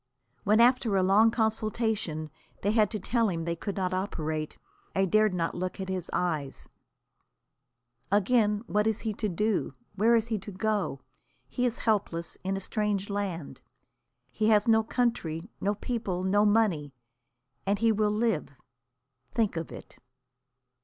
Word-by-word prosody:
When 215 +2 +4
after 240 -3 +4
a 185 - +3
long 205 +4 +5
consultation 220 -8 -1 0.3
they 205 - +2
had 215 -2 +3
to 215 - -4
tell 230 +3 +1
him 165 -3 -3
they 170 0 -1
could 200 +4 -5
not 185 -1 -1
operate, 155 -5 -3 0.4
I 195 - +3
dared 215 +3 +3
not 165 -1 -1
look 185 +2 -4
at 190 0 -4
his 185 -2 -3
eyes. 155 -7 -2 1.4
Again, 210 +1 +3
what 210 0 +1
is 220 -1 0
he 220 -2 -2
to 210 +1 -2
do? 210 +4 0 0.2
Where 225 +4 +4
is 225 -1 +2
he 220 -2 0
to 205 - -9
go? 200 -7 -1 0.5
He 245 - 0
is 240 - -3
helpless, 190 -7 -1
in 195 +1 -1
a - - -5
strange 205 0 -1
land. 180 -9 -4 0.7
He 215 0 +1
has 215 +1 +4
no 220 -1 +5
country, 215 -7 -1
no 205 +2 +1
people, 205 -5 -3
no 205 +3 +3
money. 195 -10 +2 0.7
And 200 +1 +2
he 225 +2 +3
will 215 0 +2
live, 215 -6 0 0.9
think 225 -6 +1
of 165 -1 -4
it! - - -11
205 Hz, 155 wpm, -28 LUFS, 180-220 Hz, 1.4 s, long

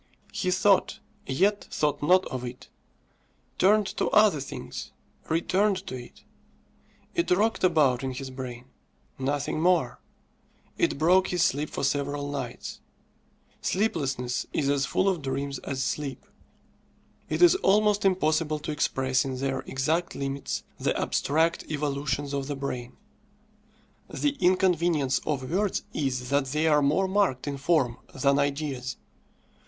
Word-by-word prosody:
He 190 -3 -1
thought, 190 +2 +3 0.3
yet 200 +10 +1
thought 150 -1 0
not 180 +5 +4
of 130 -1 -5
it; 125 0 -8 0.9
turned 210 +2 +5
to - - +1
other 210 -7 +5
things 70 - -7 0.4
returned 190 +4 +1
to - - -5
it. 120 -1 -11 0.9
It 340 - 0
rocked 210 +5 +2
about 145 -8 +3
in 130 -1 -2
his 130 +1 -6
brain 125 -2 -7 0.5
nothing 145 +3 -1
more. 165 -8 +2 0.8
It - - +1
broke 180 +5 +4
his 175 -2 +1
sleep 155 -5 +1
for - - -4
several 145 +1 -1
nights. 125 -4 -5 0.8
Sleeplessness 135 - -1
is 140 -2 0
as 140 -1 +1
full 190 - +1
of 185 -5 +1
dreams 140 0 -3
as 135 -1 -3
sleep. 140 0 -3 1.0
It - - +2
is 350 - +8
almost 210 - +3
impossible 155 -5 +2
to 150 +1 -5
express 135 -3 +1
in 130 -1 -4
their 135 0 -1
exact 160 +6 -1
limits 140 0 -3 0.2
the - - 0
abstract 160 +3 +1
evolutions 145 -2 -2
of 140 -1 -2
the 145 - -3
brain. 125 -3 -5 1.1
The 290 -1 -1
inconvenience 175 -6 +2
of 135 -4 -1
words 200 +2 0
is 130 -4 -2
that 140 -1 +2
they 150 +4 0
are 150 -2 +4
more 155 +7 +2
marked 190 -10 +1
in 140 -1 -2
form 135 -5 +1 0.2
than 140 +1 +2
ideas. 140 -3 -2
145 Hz, 135 wpm, -27 LUFS, 135-180 Hz, 1.1 s, is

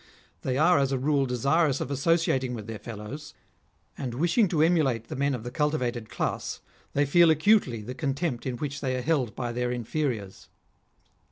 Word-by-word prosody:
They 130 -1 -1
are 160 +1 +5
as 135 -1 +1
a 135 - +1
rule 140 +1 +1
desirous 140 +4 +2
of 140 - -4
associating 135 -3 +1
with 110 -3 -7
their 110 -1 -6
fellows, 115 +6 -8 0.6
and 125 -4 -4
wishing 175 - +3
to 160 -3 +2
emulate 140 -9 +2
the - - -4
men 140 +1 +1
of 115 - -7
the 120 - -6
cultivated 125 -6 -1
class, - - -3 0.3
they 145 +1 +2
feel 170 +4 +5
acutely 155 - +3
the 125 +4 -6
contempt 135 -2 -2
in 125 -2 -3
which 145 +1 -4
they 130 -2 -1
are 125 - -3
held 140 -7 0
by 120 -2 -3
their 125 +1 -1
inferiors. 120 -4 -3
135 Hz, 180 wpm, -27 LUFS, 120-155 Hz, 0.6 s, are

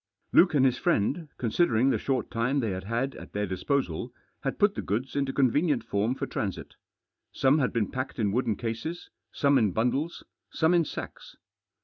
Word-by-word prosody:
Luke 180 -3 +5
and 135 -2 +5
his 130 - +2
friend, 150 - 0
considering 125 0 +2
the - - 0
short 130 -4 -1
time 125 +4 0
they 115 -6 -1
had 95 0 -5
had 120 +5 -1
at - - -11
their 105 0 -1
disposal, 95 - -2 0.3
had - - -2
put 205 0 +3
the - - -4
goods 120 +8 -3
into 140 -1 0
convfcttierit 140 0 +2
form 110 +2 0
for - - -3
transit. 100 -4 -4 0.6
Some 135 +3 +3
had 125 - +1
beeh 115 -4 -1
p&cked 130 +1 -4
in 105 -4 +1
wooden 115 -1 0
cases, 115 - -5 0.2
some 140 -1 +3
in 105 -6 +1
bundles, 135 - -1 0.3
some 160 +2 +2
in 170 -2 +4
sacks. - - -8
130 Hz, 185 wpm, -28 LUFS, 110-140 Hz, 0.6 s, Luke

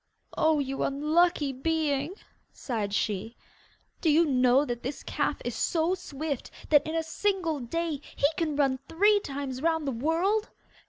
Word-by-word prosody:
'Oh, 315 -1 +3
you 270 -1 -2
unlucky 300 +1 +2
being!' 300 +2 -1 0.4
sighed 215 -6 -3
she. 210 +2 -2 0.6
'Do 325 - +2
you 320 +3 +5
know 255 0 +4
that 240 -3 -4
this 265 +3 -5
calf - - -1
is - - -2
so 330 +1 +1
swift 305 -6 -4 0.2
that 295 -1 +5
in 315 - -3
a 325 - +1
single 340 -2 -1
day 310 +4 -3
he - - +1
can 310 -3 -1
run 270 -2 +2
three 410 +6 +4
times 275 -5 -5
round 320 -2 +1
the - - +1
world? 335 - 0
295 Hz, 155 wpm, -28 LUFS, 270-330 Hz, 0.6 s, you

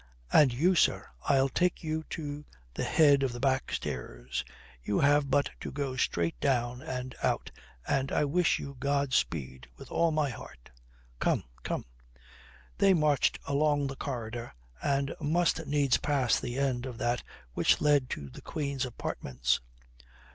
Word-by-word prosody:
And 145 -4 +7
you, 160 +10 +3
sir, 175 - +3 0.2
I'll 135 -1 +4
take 180 +6 0
you 160 0 -2
to 145 -2 -5 0.3
the - - -2
head 145 -3 +5
of 135 -2 +1
the 120 - -6
back 130 0 +1
stairs. - - -4 0.4
You 100 +11 0
have 145 0 +4
but 140 - +2
to - - -6
go 135 -2 -3
straight 85 -9 0
down 125 -2 0
and 130 0 -5
out, - - 0 0.4
and 135 0 0
I 150 - +2
wish 170 +4 +2
you 140 0 -7
God 140 0 0
speed 65 - -1
with - - -12
all 170 - +3
my 155 -3 +1
heart. - - -11 0.5
Come, - - +1 0.2
come!" - - -3 0.9
They 195 -2 +6
marched 150 -4 +2
along 145 0 +2
the 135 0 -4
corridor 120 - -5 0.3
and 140 -1 0
must 160 0 +1
needs 140 -2 +3
pass 135 -6 +2
the 120 0 -4
end 130 -2 0
of 125 -3 -7
that 120 -1 0 0.3
which - - +3
led 145 -4 +3
to 70 -2 -5
the - - -11
Queen's 140 -3 -2
apartments. 65 - -1
135 Hz, 155 wpm, -30 LUFS, 120-145 Hz, 0.9 s, And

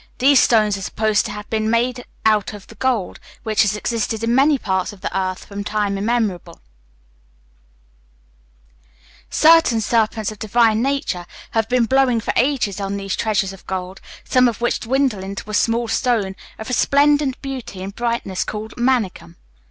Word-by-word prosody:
These 275 +1 +5
stones 215 -4 +3
are - - -9
supposed 215 +3 0
to - - -6
have 210 0 -8
been 220 -1 0
made 245 +2 0 0.2
out 215 -1 +2
of 205 -2 -10
the - - -14
gold, 245 -8 -1 0.2
which 215 -2 +1
has 210 -1 +2
existed 225 0 -2
in 230 +1 +1
many 280 +3 +4
parts 190 -5 -1
of 200 -3 -15
the - - -4
earth 185 -1 -2
from 200 0 -6
time 205 -1 -1
immemorial. 210 -3 -2 2.7
Certain 320 -7 +5
serpents 220 -1 0
of 215 - -11
divine 220 0 +2
nature 270 -10 -2 0.2
have 225 -1 0
been 250 -1 +3
blowing 260 -1 +2
for 225 - -2
ages 245 -7 +1
on 195 0 -3
these 195 -1 -3
treasures 210 -3 0
of 195 - -15
gold, 185 0 -5 0.2
some 255 -1 +3
of 230 -4 -2
which 240 - 0
dwindle 255 -4 0
into 195 +1 -7
a - - -7
small 230 +2 +1
stone 225 -5 0 0.2
of 220 - -8
resplendent 285 +1 +2
beauty 255 -8 -6
and 195 +1 -6
brightness 230 -5 -2
called 215 +1 -6
manikkam. 240 - -1
220 Hz, 165 wpm, -20 LUFS, 200-245 Hz, 2.7 s, These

